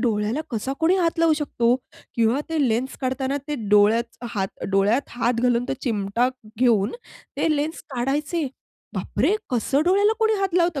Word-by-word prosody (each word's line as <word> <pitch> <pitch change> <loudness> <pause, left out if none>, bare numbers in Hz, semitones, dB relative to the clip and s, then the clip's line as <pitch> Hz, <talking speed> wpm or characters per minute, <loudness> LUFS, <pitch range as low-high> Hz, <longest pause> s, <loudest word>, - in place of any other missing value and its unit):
डोळ्याला 220 +3 0
कसा 240 +3 -2
कोणी 335 +3 +4
हात 335 -2 0
लावू 330 -1 +4
शकतो 250 -5 +1 0.4
किंवा 230 +4 +2
ते 325 -2 -1
लेन्स 240 +4 -1
काढताना 265 +1 -1
ते 295 - -1
डोळ्यात 215 +3 +3 0.2
हात 195 -2 0 0.2
डोळ्यात 200 +7 +3
हात 240 0 0
घालून, 245 -1 +2
तो - - 0
चिमटा 225 +1 0 0.3
घेऊन 225 -6 +3 0.4
ते - - +1
लेन्स 310 +3 -3
काढायचे? 290 +6 -1 0.5
बाप - - -6
रे! 410 - +4 0.2
कसं 260 +4 +1
डोळ्याला 400 +4 +4
कोणी 440 -1 +3
हात 385 -3 -1
लावतं 340 -5 +2
255 Hz, 160 wpm, -23 LUFS, 230-315 Hz, 0.5 s, कोणी